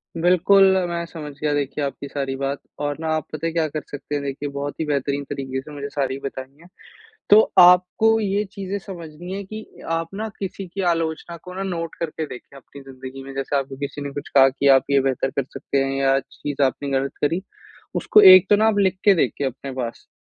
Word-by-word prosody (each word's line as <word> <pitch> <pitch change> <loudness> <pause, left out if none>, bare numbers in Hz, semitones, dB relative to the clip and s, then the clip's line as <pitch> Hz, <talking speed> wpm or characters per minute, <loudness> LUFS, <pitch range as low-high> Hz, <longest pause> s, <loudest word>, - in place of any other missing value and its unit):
बिल्कुल, 180 +3 +4 0.3
मैं 170 0 -3
समझ 155 -3 -8
गया 150 0 0
देखिए 145 0 -2
आपकी 140 +1 -5
सारी 135 -1 -3
बात 135 +1 -3 0.2
और 145 0 -2
ना 160 - -4
आप 155 - -2
पता 155 +1 -4
है - - -2
क्या 165 -2 +1
कर 155 +1 -4
सकते 145 +1 -5
हैं। 145 - -2
देखिये 140 +1 -4
बहुत 140 +1 -5
ही 160 - -1
बेहतरीन 140 -1 -1
तरीके 130 -1 -4
से 150 - -12
मुझे 140 -1 -6
सारी 135 -2 -2
बताई 135 0 -7
हैं। 170 - -16 0.6
तो 210 - +9 0.2
आपको 180 +5 +6
ये 205 -1 0
चीज़ें 200 0 -4
समझनी 175 -3 -9
है 200 +1 -4
कि, 215 +3 -8 0.2
आप 165 0 -1
ना 215 +3 -3
किसी 195 0 -5
की 185 +3 -5
आलोचना 165 +1 -3
को 180 - -9
ना, 190 +1 -4
नोट 165 -4 -4
करके 160 -1 -3
देखें 135 0 -11
अपनी 140 +1 -14
ज़िंदगी 135 0 -10
में। 135 - -9
जैसे 135 +1 -2
आपको 135 -1 -4
किसी 140 +1 -5
ने 140 0 -5
कुछ 145 - -6
कहा 135 0 +8
कि, 140 +1 -1
आप 135 -1 +6
ये 140 -1 +4
बेहतर 135 0 0
कर 140 - -1
सकते 135 0 -1
हैं 135 0 -2
या 135 0 +3
चीज़ 145 +1 -6
आपने 135 +1 -1
गलत 135 +1 -4
करी। 165 +5 +1 0.5
उसको 210 - +5
एक 185 +1 +5
तो 205 - +7
ना 215 +2 +3
आप 220 -2 +2
लिख 190 -2 +2
के 205 - +7
देखिए 145 -4 0
अपने 135 +1 -7
पास 120 -3 -5
145 Hz, 225 wpm, -22 LUFS, 135-175 Hz, 0.6 s, तो